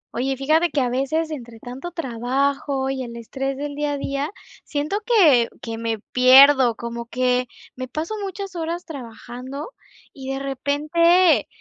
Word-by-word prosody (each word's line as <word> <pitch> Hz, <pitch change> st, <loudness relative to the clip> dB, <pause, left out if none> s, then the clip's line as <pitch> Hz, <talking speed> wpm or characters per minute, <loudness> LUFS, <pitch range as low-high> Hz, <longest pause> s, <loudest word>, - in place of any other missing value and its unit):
Oye, 265 Hz, +2 st, -1 dB
fíjate 310 Hz, +6 st, +2 dB
que 295 Hz, -, -1 dB
a 250 Hz, -, +1 dB
veces 310 Hz, +6 st, -1 dB
entre 235 Hz, -6 st, -8 dB
tanto 250 Hz, +9 st, -7 dB
trabajo 270 Hz, -1 st, -1 dB
y 270 Hz, -1 st, -3 dB
el 235 Hz, -1 st, -8 dB
estrés 270 Hz, +4 st, -4 dB
del 290 Hz, +1 st, -4 dB
día 295 Hz, 0 st, -2 dB
a -, -, -2 dB
día, 275 Hz, +1 st, -2 dB, 0.3 s
siento 305 Hz, +8 st, -2 dB
que 320 Hz, -, +5 dB
que 225 Hz, -1 st, -6 dB
me 230 Hz, -1 st, -2 dB
pierdo, 260 Hz, -1 st, +7 dB
como 235 Hz, 0 st, -6 dB
que 250 Hz, 0 st, +1 dB, 0.3 s
me 255 Hz, 0 st, -5 dB
paso 310 Hz, -, -4 dB
muchas 390 Hz, -1 st, -6 dB
horas 340 Hz, +1 st, -3 dB
trabajando 255 Hz, -, -8 dB, 0.4 s
y 270 Hz, -1 st, -6 dB
de -, -, -3 dB
repente, 295 Hz, -, +2 dB
275 Hz, 155 wpm, -22 LUFS, 250-310 Hz, 0.4 s, pierdo